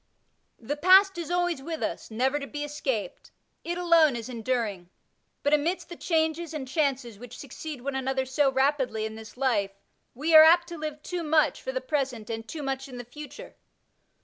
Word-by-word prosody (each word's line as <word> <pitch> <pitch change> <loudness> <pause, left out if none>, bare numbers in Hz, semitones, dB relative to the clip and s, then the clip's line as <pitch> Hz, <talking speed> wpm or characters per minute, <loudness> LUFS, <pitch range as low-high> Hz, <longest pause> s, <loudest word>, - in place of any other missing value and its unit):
The 280 +6 -4
past 380 +3 +6
is 335 - -5
always 350 -4 0
with 320 +2 -5
us, - - -4
never 260 +6 0
to 280 - -6
be 295 +1 -5
escaped; 265 -9 -4 0.3
it 345 +1 -3
alone 335 -6 +4
is 235 +1 -6
enduring; 225 -7 -2 0.5
but, 285 - +2
amidst 320 +5 0
the 345 - -7
changes 320 -1 -1
and 270 -4 -5
chances 265 -6 -1
which 245 +1 -10
succeed 285 0 -8
one 280 +2 -3
another 265 0 -1
so 270 +1 +2
rapidly 265 -5 +1
in 220 - -5
this 220 +1 -11
life, 210 -7 0 0.4
we 305 +6 -1
are 315 0 +11
apt 340 +2 +6
to 340 - -7
live 305 -1 -5
too 360 -1 -4
much 310 -1 +2
for - - -4
the - - -3
present 260 - -2
and 225 0 -5
too 305 +2 -6
much 270 0 -3
in 255 -2 -9
the 245 - -7
future. 290 +3 -10
280 Hz, 190 wpm, -27 LUFS, 250-320 Hz, 0.5 s, are